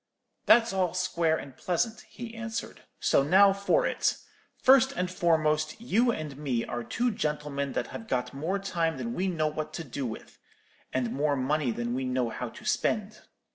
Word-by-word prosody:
"'That's 230 -3 +6
all 185 -2 0
square 170 -3 +1
and 135 -4 -9
pleasant,' 215 - -1
he 235 -1 -8
answered; 230 -1 -5 0.2
'so - - +3
now 195 +7 +6
for 200 - +2
it. - - +1 0.4
First 265 0 +6
and 180 -4 -2
foremost, 155 -3 +1
you 240 +1 +2
and 150 - -5
me 130 -6 -1
are 120 0 -4
two 245 - 0
gentlemen 150 -6 -2
that - - -1
have 225 - -7
got 125 - -1
more 160 +8 -1
time 170 -6 -1
than 120 -2 -4
we 185 +7 -1
know 165 -4 0
what 155 0 -3
to 165 - -4
do 135 -2 -4
with, 110 - -9 0.5
and 125 -3 -1
more 145 +1 +1
money 140 +1 0
than 120 +1 -2
we 130 +1 -1
know 125 -2 0
how - - -4
to - - -13
spend. - - 0
155 Hz, 180 wpm, -28 LUFS, 135-195 Hz, 0.5 s, That's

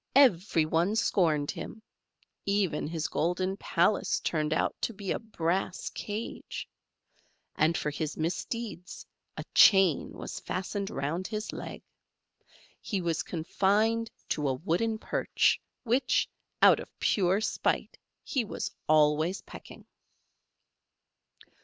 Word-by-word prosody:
Every 190 - +5
one 170 +6 +1
scorned 160 -9 +2
him; 220 - -8 0.6
even 200 -7 0
his 160 -1 -2
golden 185 +3 0
palace 180 0 +1
turned 155 -2 -1
out - - +1
to 230 - -1
be 195 -1 -4
a - - 0
brass 185 -4 -2
cage; 210 +2 -5 0.9
and 160 +2 +2
for 150 - -2
his 155 +1 -4
misdeeds 180 +3 -4 0.3
a - - -4
chain 190 -7 +6
was - - -6
fastened 195 +2 -3
round 155 +7 -2
his 215 0 -4
leg. - - -7 1.0
He 200 - -2
was 170 -3 0
confined 210 +7 +1 0.2
to 150 -1 0
a 130 - 0
wooden 200 - 0
perch, - - +1 0.2
which, 245 +3 +2 0.4
out - - +8
of - - -8
pure 190 -1 +2
spite, 220 - -1 0.2
he 260 - 0
was 215 - -4 0.2
always 155 +4 +3
pecking. - - -12
185 Hz, 115 wpm, -29 LUFS, 160-210 Hz, 1.0 s, out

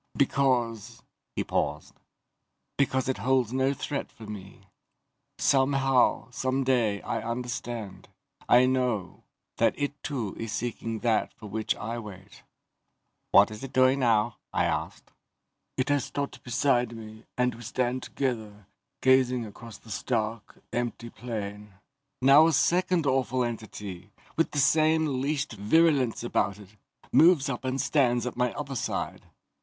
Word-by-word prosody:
"Because 120 -5 0
..." - - -56
He - - 0
paused. - - -2 0.8
"Because 130 -2 +1
it 130 -5 -1
holds 125 +1 +1
no 130 +1 +2
threat 140 +1 -4
for 110 - -12
me. 100 -2 -10 0.7
Somehow, 135 -2 +2
someday, 130 -5 0
I - - -2
understand 120 -3 -5 0.4
I 125 +1 +7
know 125 -6 -1 0.4
that - - +2
it 145 0 -3
too 120 -10 -3
is 115 -1 -4
seeking 115 -1 -3
that 115 -2 +1
for 110 - -12
which 110 +1 -2
I 115 +3 -4
wait." 100 -3 -11 0.9
"What 100 +2 +6
is 110 +4 -8
it 135 - -7
doing 130 +1 +4
now?" 115 -2 +2
I - - +1
asked. - - -3 0.7
"It 130 +2 0
has 145 -2 +2
stopped 140 -1 -4
beside 125 -2 +1
me 110 0 -11
and 125 -1 +2
we 115 - -11
stand 125 +2 -1
together, 110 -8 -4 0.4
gazing 130 -2 +4
across 110 +1 -11
the 110 - -14
stark, 110 0 -3
empty 120 -1 -3
plain. 105 -4 -6 0.5
Now 140 +4 +8
a 165 - +2
second 175 +2 +2
awful 130 -2 +1
entity, 105 -5 -6 0.3
with 165 - +2
the - - -6
same 155 -1 +3
leashed 145 0 -1
virulence 130 +3 +2
about 100 -4 0
it, 105 0 -15 0.4
moves 160 -4 +5
up 130 -2 -4
and 130 +1 -2
stands 125 -5 +2
at 125 - -4
my 125 -1 +1
other 140 -2 -5
side. 115 - -3
125 Hz, 140 wpm, -27 LUFS, 110-135 Hz, 0.9 s, Now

